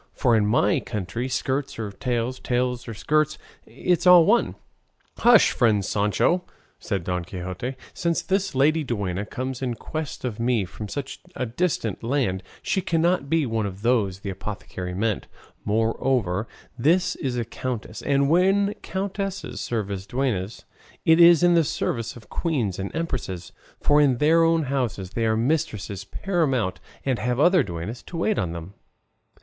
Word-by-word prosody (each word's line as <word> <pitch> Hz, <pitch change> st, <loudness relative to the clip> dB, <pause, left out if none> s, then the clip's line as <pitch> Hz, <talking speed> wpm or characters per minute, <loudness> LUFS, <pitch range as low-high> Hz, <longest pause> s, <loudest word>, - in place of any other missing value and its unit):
for 120 Hz, -4 st, +3 dB
in 105 Hz, -2 st, +3 dB
my 105 Hz, -2 st, +3 dB
country 105 Hz, +5 st, -4 dB
skirts 130 Hz, +3 st, -2 dB
or 110 Hz, -3 st, -4 dB
tails, 120 Hz, +4 st, -2 dB
tails 125 Hz, 0 st, -1 dB
or 115 Hz, -, -5 dB
skirts, 155 Hz, +6 st, +1 dB, 0.3 s
it's 180 Hz, 0 st, 0 dB
all 180 Hz, -2 st, +9 dB
one." 235 Hz, +6 st, +3 dB, 0.6 s
"Hush, 240 Hz, -2 st, +6 dB
friend 110 Hz, -6 st, +2 dB
Sancho," 105 Hz, -, +1 dB, 0.4 s
said 100 Hz, -5 st, -2 dB
Don 90 Hz, 0 st, -2 dB
Quixote; 95 Hz, +8 st, -5 dB, 0.2 s
"since 170 Hz, -1 st, -1 dB
this 195 Hz, -3 st, 0 dB
lady 155 Hz, +4 st, +3 dB
duenna 100 Hz, -6 st, -2 dB
comes 130 Hz, 0 st, -4 dB
in 125 Hz, -3 st, -1 dB
quest 155 Hz, +1 st, -5 dB
of 120 Hz, -3 st, -4 dB
me 115 Hz, -4 st, +1 dB
from 90 Hz, +5 st, -8 dB
such 135 Hz, +5 st, -5 dB, 0.2 s
a 130 Hz, -, -1 dB
distant 120 Hz, -, -1 dB
land 115 Hz, -7 st, 0 dB, 0.2 s
she 190 Hz, -, 0 dB
cannot 170 Hz, -3 st, +1 dB
be 165 Hz, -1 st, +2 dB
one 110 Hz, -3 st, -1 dB
of 100 Hz, +1 st, -8 dB
those 105 Hz, -6 st, +1 dB
the 100 Hz, -, -4 dB
apothecary 95 Hz, -2 st, -6 dB
meant; 105 Hz, +1 st, -1 dB, 0.4 s
moreover 110 Hz, -2 st, 0 dB, 0.3 s
this 160 Hz, +9 st, +2 dB
is 130 Hz, -3 st, -2 dB
a 120 Hz, -, -1 dB
countess, 115 Hz, -2 st, -5 dB
and 140 Hz, -1 st, +2 dB
when 195 Hz, +5 st, +3 dB
countesses 195 Hz, 0 st, -4 dB
serve 110 Hz, -4 st, -2 dB
as 95 Hz, 0 st, -5 dB
duennas 115 Hz, -5 st, -2 dB, 0.4 s
it 160 Hz, +1 st, +6 dB
is 170 Hz, -1 st, +8 dB
in 175 Hz, 0 st, +6 dB
the 165 Hz, -1 st, +5 dB
service 115 Hz, -5 st, -2 dB
of 115 Hz, -3 st, -13 dB
queens 125 Hz, -, -1 dB
and 95 Hz, 0 st, -3 dB
empresses, 125 Hz, -, -4 dB, 0.3 s
for 145 Hz, 0 st, +4 dB
in 135 Hz, -4 st, +3 dB
their 160 Hz, +5 st, +4 dB
own 165 Hz, -1 st, +3 dB
houses 125 Hz, -9 st, -2 dB
they 115 Hz, +2 st, 0 dB
are 110 Hz, 0 st, +2 dB
mistresses 110 Hz, -, -1 dB
paramount 130 Hz, -, -1 dB, 0.3 s
and 130 Hz, -5 st, 0 dB
have 125 Hz, +4 st, -1 dB
other 175 Hz, +3 st, +5 dB
duennas 100 Hz, +2 st, -5 dB
to 170 Hz, -, -8 dB
wait 205 Hz, +5 st, +1 dB
on 85 Hz, -, -1 dB
them." 85 Hz, +3 st, -7 dB
125 Hz, 160 wpm, -24 LUFS, 105-155 Hz, 0.6 s, all